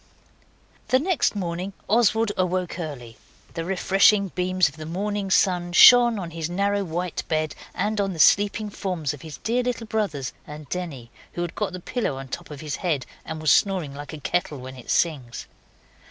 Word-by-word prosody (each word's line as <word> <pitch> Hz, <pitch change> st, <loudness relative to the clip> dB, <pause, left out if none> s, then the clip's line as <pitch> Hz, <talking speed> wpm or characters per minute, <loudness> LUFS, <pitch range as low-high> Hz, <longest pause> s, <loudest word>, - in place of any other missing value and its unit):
The 255 Hz, -, +4 dB
next 315 Hz, -, +1 dB
morning 180 Hz, 0 st, -3 dB
Oswald 225 Hz, 0 st, +3 dB
awoke 185 Hz, -1 st, -1 dB
early. 125 Hz, -8 st, -7 dB, 0.4 s
The 165 Hz, -, -3 dB
refreshing 195 Hz, +2 st, +3 dB
beams 185 Hz, -1 st, +1 dB
of 145 Hz, +1 st, -9 dB
the 155 Hz, 0 st, -7 dB
morning 200 Hz, +3 st, -2 dB
sun 180 Hz, -2 st, +2 dB
shone 240 Hz, +2 st, +8 dB
on 175 Hz, -4 st, -5 dB
his 165 Hz, 0 st, -4 dB
narrow 200 Hz, +3 st, 0 dB
white 175 Hz, 0 st, -3 dB
bed 155 Hz, -1 st, -1 dB, 0.2 s
and 210 Hz, +2 st, 0 dB
on 195 Hz, -1 st, -1 dB
the -, -, -8 dB
sleeping 205 Hz, +5 st, +4 dB
forms 175 Hz, -9 st, -3 dB
of 145 Hz, -, -11 dB
his 155 Hz, -4 st, -9 dB
dear 235 Hz, -, 0 dB
little 245 Hz, -2 st, -3 dB
brothers 200 Hz, -, -2 dB
and 150 Hz, 0 st, -9 dB
Denny, 145 Hz, -10 st, -5 dB, 0.2 s
who 175 Hz, -, -2 dB
had 175 Hz, -, -5 dB
got 210 Hz, -3 st, -2 dB
the 185 Hz, -, -6 dB
pillow 200 Hz, -, -2 dB
on 135 Hz, -1 st, -8 dB
top -, -, -6 dB
of 150 Hz, -2 st, -8 dB
his 150 Hz, -2 st, -4 dB
head 155 Hz, -8 st, -1 dB, 0.2 s
and 160 Hz, -, -5 dB
was 155 Hz, -1 st, +4 dB
snoring 185 Hz, -8 st, +1 dB
like 145 Hz, +1 st, -8 dB
a 155 Hz, -, -7 dB
kettle 155 Hz, 0 st, -1 dB
when 130 Hz, +1 st, -9 dB
it 125 Hz, -, -12 dB
sings. 135 Hz, -8 st, 0 dB
180 Hz, 185 wpm, -24 LUFS, 155-200 Hz, 0.4 s, shone